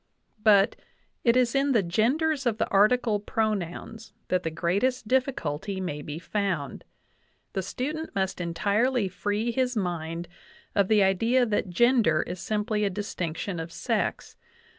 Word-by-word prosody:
But 210 0 +5 0.5
"it 235 +1 +4
is 245 -2 +3
in 275 0 +2
the 220 -5 +3
genders 265 - +1
of 225 -2 +1
the - - 0
article 215 +2 +3
pronouns 215 +1 -3 0.2
that 185 -1 +2
the 165 - -2
greatest 200 +10 0
difficulty 200 - -1
may 150 -6 -4
be 150 +1 -6
found. 180 -6 -2 0.7
The 190 - -1
student 295 - -4
must 190 -1 -1
entirely 205 +7 +1
free 205 +5 -2
his 250 -1 0
mind 170 -3 -3 0.5
of 200 -2 +3
the 210 -1 +4
idea 225 +7 +3
that 210 -4 -1
gender 225 -5 +3
is 180 +1 -6
simply 210 +2 -1
a 200 - +2
distinction 180 -2 -4
of 165 +1 -6
sex. - - -2
205 Hz, 140 wpm, -27 LUFS, 180-240 Hz, 0.7 s, But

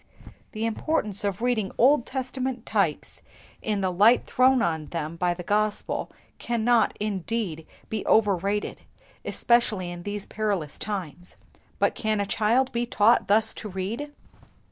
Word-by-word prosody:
The 220 0 -2
importance 215 -3 -1
of 200 +2 -2
reading 230 -6 0
Old 255 0 +4
Testament 260 -2 -3
types 195 -8 -1 0.4
in 210 -2 -1
the 185 -1 0
light 210 +7 +5
thrown 255 0 +3
on 160 -3 -1
them 165 -1 -4
by 175 0 0
the 180 - -7
Gospel 210 +2 -1 0.3
cannot, 235 -1 +2
indeed, 200 -4 -3 0.2
be 220 -2 -3
overrated, 205 -1 +1 0.4
especially 215 -7 +1
in 175 0 -7
these 205 +2 -5
perilous 200 -9 -2
times; 180 -5 -5 0.4
but - - +2
can 215 -1 -1
a 200 - 0
child 235 +6 +1
be 235 0 -1
taught 225 0 +3
thus 215 +2 +3
to 215 - -7
read 190 +4 -3
them?" 290 0 -7
210 Hz, 145 wpm, -26 LUFS, 190-235 Hz, 0.4 s, light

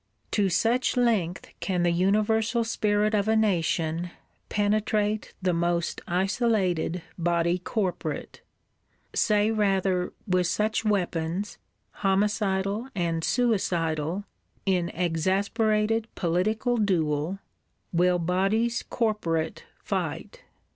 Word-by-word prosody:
To 200 -3 +2
such 235 +8 +1
length 210 -8 +1
can 180 -3 0
the 175 - +3
universal 215 +6 +2
spirit 210 -1 +1
of 205 -1 +1
a 220 - +3
Nation 175 -5 +1 0.4
penetrate 210 0 0
the 180 -1 +2
most 170 0 0
isolated 185 -3 0 0.2
Body 170 +1 +1
corporate: 185 -1 -3 0.7
say 210 0 +3
rather, 195 -4 +1
with 185 -3 +2
such 215 +5 0
weapons, 185 -2 -1 0.4
homicidal 200 +2 0
and 165 -3 -1
suicidal, 180 -7 0 0.4
in 180 -3 +1
exasperated 210 +6 +1
political 215 +8 0
duel, 165 -4 0 0.6
will 180 +1 +3
Bodies 195 +7 +1
corporate 170 -9 -1 0.2
fight! - - -3
195 Hz, 95 wpm, -26 LUFS, 175-215 Hz, 0.7 s, the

